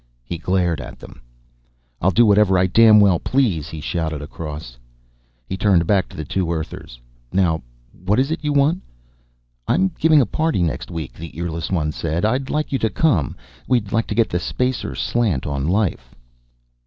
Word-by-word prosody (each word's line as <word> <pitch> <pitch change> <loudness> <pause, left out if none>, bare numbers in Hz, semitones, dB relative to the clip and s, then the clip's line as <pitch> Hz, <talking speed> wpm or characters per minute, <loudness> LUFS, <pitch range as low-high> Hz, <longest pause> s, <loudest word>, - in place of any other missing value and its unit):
He 80 +7 -6
glared 90 -4 0
at - - -9
them. - - -13 0.8
"I'll 95 - +3
do 115 +5 +4
whatever 100 -2 +4
I 90 - +3
damn 110 +3 +6
well 95 -5 +4
please," 100 - 0
he 80 - -7
shouted 80 0 -3
across. 75 -3 -7 0.7
He - - -3
turned 95 -4 +3
back 95 +1 +1
to - - -13
the 75 - -4
two 90 +2 -1
Earthers. 80 -6 -6 0.3
"Now, 85 -4 +1 0.4
what 100 +4 +1
is 135 +3 +1
it 160 - -3
you 150 - 0
want?" 145 +6 +2 0.9
"I'm 190 +2 +2
giving 155 -1 +5
a 130 - +4
party 155 - 0
next 80 - -3
week," 80 -5 -6
the 80 0 -10
earless 85 -1 -3
one 80 -5 0
said. 85 +4 -2
"I'd 130 +4 0
like 150 0 -1
you 135 - 0
to 110 - +1
come. 105 - +1 0.3
We'd 120 -6 +1
like 115 0 0
to - - -3
get 115 -1 +2
the 90 - -1
Spacer 125 +7 -2
slant 105 - 0
on 70 0 -2
life." 90 - -1
95 Hz, 180 wpm, -21 LUFS, 80-115 Hz, 0.9 s, damn